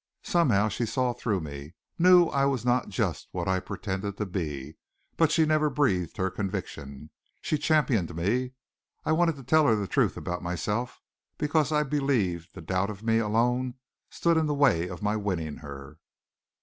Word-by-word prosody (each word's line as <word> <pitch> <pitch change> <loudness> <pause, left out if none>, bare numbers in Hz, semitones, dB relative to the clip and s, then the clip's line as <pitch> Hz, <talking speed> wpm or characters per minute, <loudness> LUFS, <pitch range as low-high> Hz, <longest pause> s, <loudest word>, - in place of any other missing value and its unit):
Somehow 120 - +3
she 110 +2 -2
saw 125 +1 0
through 105 -6 -1
me, 75 +1 -8 0.2
knew 180 0 +7
I 140 0 +1
was 130 -4 0
not 125 +1 +1
just 95 - -2
what - - -3
I 95 0 +2
pretended 100 +1 -4
to 105 - -2
be. 75 -8 -5 0.4
But 165 -2 +3
she 160 -2 +4
never 155 0 +2
breathed 100 - 0
her 95 -1 0
conviction. 80 -8 -5 0.3
She 155 - -1
championed 135 - +1
me. 120 +10 0 0.5
I - - +1
wanted 165 0 +3
to 135 - -11
tell 155 +4 +4
her 115 - +4
the 105 -1 -2
truth - - +1
about 90 0 -4
myself 95 +8 -3 0.3
because 150 0 +1
I 150 0 +3
believed 120 - -1
the - - -8
doubt 95 +4 -1
of 105 0 -8
me 115 0 +3
alone 120 +3 +1 0.3
stood 170 -1 +1
in 160 -1 +2
the 150 - 0
way 125 - +3
of - - -8
my 105 +1 +1
winning 90 -8 -2
her. 70 0 -10
110 Hz, 175 wpm, -27 LUFS, 90-140 Hz, 0.5 s, knew